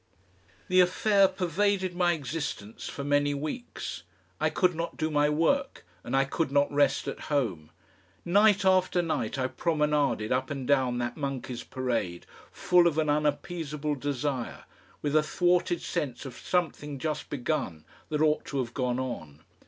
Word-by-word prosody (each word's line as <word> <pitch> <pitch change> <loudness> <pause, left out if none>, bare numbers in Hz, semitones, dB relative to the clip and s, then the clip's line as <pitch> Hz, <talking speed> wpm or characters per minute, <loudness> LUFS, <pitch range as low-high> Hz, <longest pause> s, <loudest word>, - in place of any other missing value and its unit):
The 185 0 +4
affair 195 +2 +4
pervaded 185 +1 0
my 175 -1 +3
existence 145 -7 -5
for 140 - -5
many 145 0 +2
weeks. 155 - -5 0.4
I - - +2
could 180 -1 +2
not 170 +1 -4
do 155 0 -1
my 145 0 +3
work 165 - +1 0.2
and 125 - -2
I 135 - +4
could 145 +1 -1
not 140 0 +3
rest 140 -1 +2
at - - -4
home. 105 - -1 0.6
Night 200 +2 +4
after 185 -1 +3
night 165 -3 -2
I 130 - 0
promenaded 150 -6 0
up 130 +1 0
and 135 -3 -4
down 130 -3 +2
that 120 0 -3
Monkeys' 130 -4 -4
Parade 115 -9 -2 0.3
full 180 -1 +4
of 160 -3 0
an 155 -2 +2
unappeasable 150 0 -1
desire, 140 -2 -3 0.4
with 145 0 0
a 155 - +6
thwarted 175 +2 +1
sense 130 -2 -3
of 130 -3 -7
something 150 -5 -2
just 155 +2 -3
begun 125 - -2 0.2
that 150 -1 -1
ought 155 -1 +2
to 140 - -4
have 120 -3 -2
gone 125 -2 -1
on. 80 - -6
145 Hz, 155 wpm, -28 LUFS, 130-170 Hz, 0.6 s, a